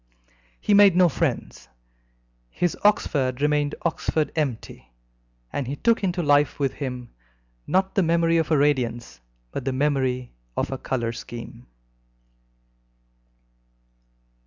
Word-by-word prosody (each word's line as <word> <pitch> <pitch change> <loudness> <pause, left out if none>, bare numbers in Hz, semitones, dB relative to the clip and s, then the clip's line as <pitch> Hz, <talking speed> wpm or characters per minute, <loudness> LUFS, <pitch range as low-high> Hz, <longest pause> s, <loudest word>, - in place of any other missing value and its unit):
He 210 - +1
made 200 -3 +7
no 180 0 +6
friends. 95 - -3 0.8
His 175 - -1
Oxford 135 -11 +2
remained 150 0 +1
Oxford 160 -2 -1
empty, 125 - -4 0.6
and 140 - -2
he 140 - -3
took 230 +8 +1
into 180 -2 0
life 145 0 +3
with 135 -2 0
him, 125 -4 -6 0.6
not 190 +1 +1
the 195 - +2
memory 165 -1 +2
of 160 -2 0
a 155 - +3
radiance, 120 - 0 0.3
but - - -4
the 135 - -1
memory 130 -3 0 0.3
of - - -1
a 135 - -4
colour 120 -3 -2
scheme. 115 - -9
145 Hz, 120 wpm, -24 LUFS, 125-165 Hz, 0.8 s, made